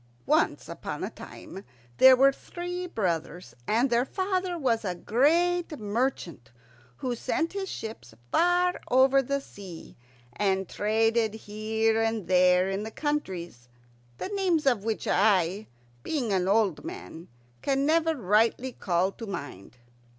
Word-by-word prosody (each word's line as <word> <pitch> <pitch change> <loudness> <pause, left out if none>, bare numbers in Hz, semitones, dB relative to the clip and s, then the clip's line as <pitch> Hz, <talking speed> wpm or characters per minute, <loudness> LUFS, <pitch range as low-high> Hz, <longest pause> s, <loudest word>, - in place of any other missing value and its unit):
Once 310 +3 +1
upon - - -6
a - - -3
time 195 - -11 0.3
there 260 0 +9
were 270 +2 +5
three 355 +5 -6
brothers, 175 - -3
and 240 +4 +2
their 235 +1 +3
father 370 +3 -2
was 245 -7 0
a 180 -3 -2
great 330 - +1
merchant 205 - -3 0.5
who 250 - -2
sent 330 +8 -2
his 390 -1 -4
ships 220 - -7 0.2
far 355 +1 +2
over 265 +2 +5
the 280 +2 -1
sea, 195 -10 -11 0.4
and 190 0 0
traded 220 +2 +1
here 220 +1 -1
and 225 -4 -1
there 180 0 +4
in 195 +2 -2
countries 185 - -4 0.5
the - - -5
names 375 -6 0
of 240 -7 +2
which 220 0 -3
I, 195 0 +2 0.3
being 245 - -2
an 185 -1 +1
old 205 0 +2
man, 325 - -9 0.3
can 275 0 +1
never 325 +1 +2
rightly 230 +3 +1
call 185 -3 0
to 225 +2 -9
mind. 125 - -7
225 Hz, 135 wpm, -27 LUFS, 195-295 Hz, 0.5 s, there